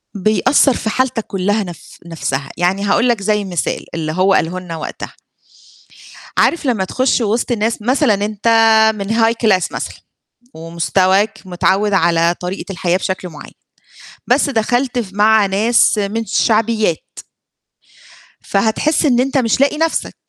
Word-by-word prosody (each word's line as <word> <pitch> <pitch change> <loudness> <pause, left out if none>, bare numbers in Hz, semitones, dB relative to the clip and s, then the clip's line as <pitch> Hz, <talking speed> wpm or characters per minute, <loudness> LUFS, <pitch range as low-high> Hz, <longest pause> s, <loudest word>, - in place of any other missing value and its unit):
بيأثّر 215 +7 +2
في 220 - -3
حالتك 245 -1 -1
كلّها 205 +3 -1
نف 175 -4 -12
نفْسها، 140 -4 -4
يعني 185 +3 0
هاقول 230 +5 +2
لك 230 -4 0
زي 210 0 0
مثال، 175 -4 -3
اللي 155 -2 -3
هو 185 +4 +2
قاله 175 +1 0
لنا 180 -2 -8
وقتها 155 - -7 1.3
عارف 340 - +1
لمّا 230 -7 0
تخش 255 +3 0
وسط 230 +3 -1
ناس 225 0 -1
مثلًا 255 +1 +2
أنت 205 +2 -3 0.5
من 200 -2 -5
High 225 0 +3
Class 190 -5 +2
مثلًا، - - -5 0.6
ومستواك 185 +5 0
متعوّد 190 +3 0
على 170 -1 +2
طريقة 185 +2 -5
الحياة 175 0 0
بشكل 190 -1 -4
معيّن، 155 -3 -12 0.7
بس 285 - +2
دخلت 245 +2 0
ف 215 -6 -4
مع 215 0 +4
ناس 215 +3 +2
من 210 +3 -2
شعبيات 220 -7 0 1.2
فهتحس 220 +11 0
إن 250 -4 +3
أنت 270 +2 0
مش 245 0 +1
لاقي 285 +2 +2
نفْسك، 325 0 -1
205 Hz, 140 wpm, -16 LUFS, 185-230 Hz, 1.3 s, مع